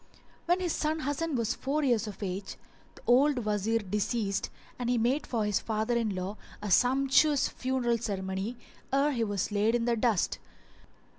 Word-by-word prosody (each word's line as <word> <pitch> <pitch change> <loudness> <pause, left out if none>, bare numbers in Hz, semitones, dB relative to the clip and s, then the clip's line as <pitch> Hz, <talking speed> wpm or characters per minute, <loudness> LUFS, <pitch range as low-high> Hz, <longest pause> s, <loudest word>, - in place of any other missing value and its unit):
When 350 +2 +3
his 350 -3 0
son 310 +1 -1
Hasan 290 +2 -1
was 230 -3 0
four 295 +3 -1
years 240 -5 +2
of 205 0 -7
age, 190 +1 -4 0.4
the - - -16
old 255 0 +4
Wazir 210 +2 +1
deceased 210 0 -1 0.3
and 245 -1 -1
he 245 - +2
made 250 +6 +1
for 225 -4 0
his 210 -1 +1
father 220 +2 -1
in 220 -4 0
law 185 +3 -4 0.2
a 210 -1 -4
sumptuous 270 - +4
funeral 250 -2 -1
ceremony 195 +1 -3 0.3
ere 275 +2 +3
he 240 -5 0
was 205 -2 -1
laid 210 +3 +2
in 235 -1 0
the 240 -1 +2
dust. 225 -4 +1
235 Hz, 170 wpm, -29 LUFS, 210-265 Hz, 0.4 s, old